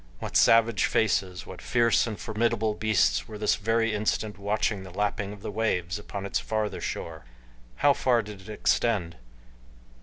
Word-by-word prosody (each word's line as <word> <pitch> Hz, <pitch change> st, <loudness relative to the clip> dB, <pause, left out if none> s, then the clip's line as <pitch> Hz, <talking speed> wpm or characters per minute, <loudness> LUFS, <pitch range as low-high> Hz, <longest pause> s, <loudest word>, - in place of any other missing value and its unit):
What -, -, -7 dB
savage 115 Hz, -1 st, +5 dB
faces, 95 Hz, -4 st, 0 dB
what -, -, -10 dB
fierce 120 Hz, -1 st, +2 dB
and 105 Hz, -5 st, -5 dB
formidable 110 Hz, +1 st, 0 dB
beasts 85 Hz, -, +1 dB
were 105 Hz, -, -8 dB
this 105 Hz, 0 st, +2 dB
very 115 Hz, +1 st, 0 dB
instant 105 Hz, -1 st, -1 dB
watching 105 Hz, 0 st, -1 dB
the 95 Hz, -, -10 dB
lapping 100 Hz, +1 st, -2 dB
of 105 Hz, -1 st, -11 dB
the -, -, -4 dB
waves 95 Hz, -4 st, -1 dB
upon 100 Hz, -1 st, -6 dB
its 100 Hz, -, -1 dB
farther 110 Hz, -1 st, -2 dB
shore! 80 Hz, -4 st, -5 dB, 0.6 s
How 145 Hz, -, +7 dB
far 120 Hz, -4 st, +2 dB
did 105 Hz, -2 st, -10 dB
it 95 Hz, -, -13 dB
extend? 105 Hz, -5 st, 0 dB
105 Hz, 160 wpm, -27 LUFS, 95-110 Hz, 0.6 s, How